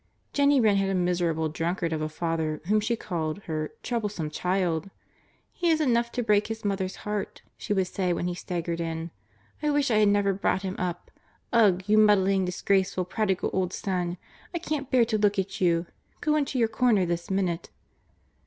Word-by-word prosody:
Jennie 285 -1 +4
Wren 215 -4 +4
had 195 0 +1
a 195 - 0
miserable 175 -3 +1
drunkard 165 +2 -2
of 155 - -2
a 155 - -2
father, 160 -1 -2
whom 210 +4 +3
she 225 +3 0
called 170 -3 -4
her 155 -2 -3
"troublesome 210 -10 -2
child." 180 0 -1 0.6
"He 350 -1 0
is 320 -1 +3
enough 235 -5 +2
to 245 - -1
break 210 -2 +3
his 225 -1 -6
mother's 190 -2 -1
heart," 210 -1 -4
she - - -7
would 190 -2 +2
say 180 0 -1
when 175 0 -1
he 180 - -1
staggered 170 -1 -3
in. 165 0 -4 0.5
"I 300 - +1
wish 290 -3 +2
I 215 - +4
had 210 -1 +5
never 200 -1 +2
brought 190 0 0
him 190 0 -3
up. 175 -1 -4 0.4
Ugh! 200 -6 +4
You 215 +2 +4
muddling, 195 -2 +4
disgraceful, 185 0 0
prodigal 190 0 -1
old 185 -1 0
son! 180 -2 -2 0.4
I - - +2
can't 305 -5 -3
bear 250 -3 +4
to 220 -1 0
look 205 0 +2
at 190 0 -2
you. 170 -1 +3 0.3
Go 305 0 +1
into 280 -3 0
your 230 -2 +3
corner 220 -4 +2
this 170 0 -3
minute." 185 -3 -1
190 Hz, 190 wpm, -27 LUFS, 175-215 Hz, 0.6 s, had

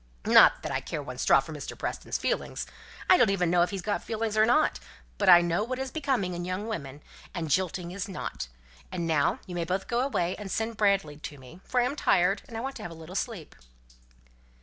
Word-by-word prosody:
Not - - +6
that - - -3
I - - -1
care 150 - -5
one 125 -2 -8
straw - - +5
for 155 +4 -9
Mr. 150 - -7
Preston's - - -3
feelings. - - -2 0.4
I 365 - +7
don't 240 - +4
even 180 -4 +1
know 175 -1 +4
if 175 - +3
he's 195 -2 -5
got 205 - -1
feelings 220 -1 -2
or 215 0 +5
not; 305 +6 +3 0.4
but 200 -2 +3
I 175 -1 +10
know 175 +3 0
what 255 +3 -3
is 265 0 -4
becoming 260 - -1
in 175 - -4
a - - -4
young 185 +3 -3
woman, 145 -10 -5 0.3
and 165 -4 -3
jilting 180 +1 0
is 195 +2 -5
not. 185 - -5 0.4
And 170 - -3
now 155 -3 +2
you 180 - -8
may 175 -1 -1
both 185 +3 -2
go 235 -1 0
away, 190 -9 0
and 205 -2 -7
send 225 +3 -2
Bradley 195 -8 +1
to 150 -1 -8
me, 135 +7 -14
for 250 - 0
I'm 250 +3 +1
tired, 195 -6 +2
and 225 -1 -5
want 270 0 -4
to - - -9
have - - -5
a 165 - -10
little 160 +2 -10
sleep." 200 - -4
185 Hz, 230 wpm, -28 LUFS, 170-220 Hz, 0.4 s, I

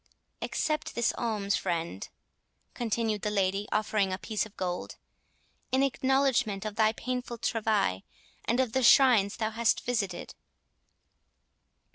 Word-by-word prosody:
"Accept 305 -1 -2
this 235 0 +1
alms, 210 -4 -1
friend," 165 - -3 0.6
continued 225 -2 -1
the 210 - -1
lady, 200 0 0
offering 210 -2 +1
a 185 - -2
piece 215 +1 -2
of 215 - -25
gold, 180 -1 -3 0.8
"in 260 +1 +3
acknowledgment 265 -6 +1
of 210 -1 -4
thy 220 0 +4
painful 250 0 -4
travail, 215 - 0 0.4
and 235 +3 +1
of 255 -4 +1
the 265 - +2
shrines 235 -5 +5
thou 220 -1 -1
hast 230 0 +1
visited." 200 -8 -2
220 Hz, 125 wpm, -29 LUFS, 200-240 Hz, 0.8 s, shrines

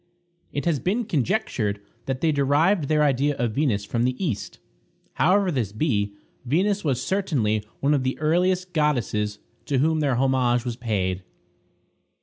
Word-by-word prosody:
It 145 - -3
has 165 -5 +1
been 220 - 0
conjectured 135 - -1 0.3
that 130 -1 -2
they 165 - +3
derived 145 +4 +2
their 150 0 +3
idea 145 +1 +2
of 120 -2 0
Venus 110 -6 0
from 115 +3 -1
the 125 +1 +1
East. 150 - -3 0.6
However 190 +2 +3
this 120 - -1
be, 105 -4 -1 0.3
Venus 190 +10 +1
was 135 -6 0
certainly 130 - 0 0.2
one 140 +2 +3
of 140 - +2
the 130 0 -1
earliest 180 +4 +1
goddesses 120 -9 0 0.3
to 140 - +1
whom 155 +4 +2
their 140 -4 +1
homage 125 -1 +2
was 120 -2 -2
paid. 95 -6 -1
140 Hz, 150 wpm, -24 LUFS, 120-160 Hz, 0.6 s, they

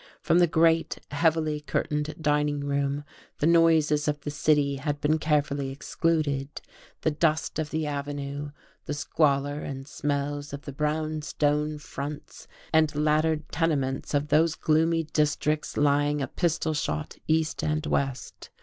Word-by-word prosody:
From 170 - +3
the 175 - +5
great, 165 0 +2
heavily 155 0 +1
curtained 150 +1 -2
dining 150 -1 +1
room 140 0 -1 0.3
the - - 0
noises 160 -3 +4
of 150 0 0
the 145 - -4
city 145 -2 +2
had 145 +2 -2
been 155 +1 +2
carefully 145 -3 0
excluded; 145 0 -1 0.4
the 160 - +1
dust 155 0 0
of 155 -1 -2
the 155 0 -1
Avenue, 145 0 -4 0.4
the 145 - -3
squalour 145 -1 +1
and 135 -2 -6
smells 145 0 -3
of 140 +1 -6
the 140 - -7
brown 155 +2 -1
stone 150 +1 0
fronts 145 0 -7 0.3
and 155 -2 +3
laddered 155 +1 +1
tenements 145 -4 0
of 145 +1 0
those 160 +2 +3
gloomy 165 +1 +2
districts 150 0 0
lying 145 0 +2
a 135 - 0
pistol 165 -2 0
shot 75 - -3
east 160 0 +1
and 155 0 0
west. 135 -4 -2
150 Hz, 140 wpm, -27 LUFS, 145-155 Hz, 0.4 s, the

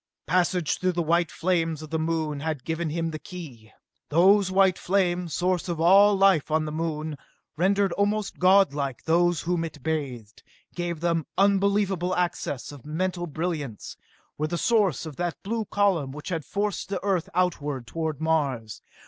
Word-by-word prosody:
Passage 180 -2 +1
through 185 0 +1
the 175 0 0
white 170 +1 +2
flames 165 -3 -1
of 155 - -10
the 160 - 0
Moon 160 -2 -1
had 155 -3 -3
given 160 0 -2
him 165 +1 -2
the 155 - -6
key. 140 - -10 0.4
Those 190 +5 +5
white 190 -1 +3
flames 180 -3 0
source 180 0 0
of 170 -2 -2
all 200 +5 +6
life 195 -6 +4
on 155 0 +1
the 150 - -4
Moon 155 -2 -3 0.4
rendered 195 +3 +2
almost 205 +2 -1
godlike 150 -9 +3
those 175 +1 +2
whom 175 -1 -1
it 155 -4 -8
bathed... 130 -9 -4 0.3
gave 175 -2 -4
them 170 -2 0
unbelievable 195 -2 +2
access 175 -7 -2
of 145 -4 -12
mental 175 +3 -2
brilliance... 155 - -4 0.4
were 155 - 0
the 170 +2 -2
source 200 - +2
of 155 -4 -8
that 175 -1 -2
blue 220 +2 -2
column 190 -11 +1
which 150 +5 -8
had 165 -4 -3
forced 205 -1 -2
the 195 -2 -2
Earth 195 -2 0
outward 150 -8 -1
toward 160 +1 -3
Mars 140 -9 -1
170 Hz, 165 wpm, -26 LUFS, 155-185 Hz, 0.4 s, all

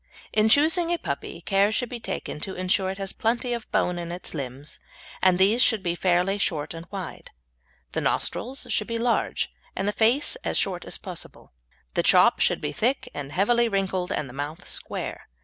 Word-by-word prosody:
In 215 0 +4
choosing 320 +7 +4
a 345 - +2
puppy - - -5
care 200 +1 +3
should 240 +2 -1
be 245 - -5
taken 225 - -5
to 190 +5 -5
ensure 185 +1 +1
it 190 - -4
has 195 -1 -2
plenty 240 +2 0
of 235 -2 -6
bone 180 -1 +1
in 170 0 -5
its 175 +1 -3
limbs, 140 -1 -5 0.4
and 185 -1 +5
these 205 +6 +4
should 225 -6 +4
be 170 -2 0
fairly 180 +3 +2
short 155 -6 0
and 165 +1 -9
wide; 190 -5 -7 0.6
the - - -1
nostrils 260 +3 -1
should - - +1
be 230 -1 -2
large 235 0 0 0.2
and 195 - -1
the - - +3
face 235 - +3
as - - -1
short 180 -3 0
as - - -3
possible. 180 - -8 0.4
The - - +2
chop - - +5
should - - +2
be 150 - -2
thick 250 - 0
and 145 -1 -6
heavily 235 +8 +3
wrinkled 190 -3 -1
and 150 - -1
the 125 - -11
mouth 145 +4 -5
square. - - -3
195 Hz, 195 wpm, -26 LUFS, 175-230 Hz, 0.6 s, and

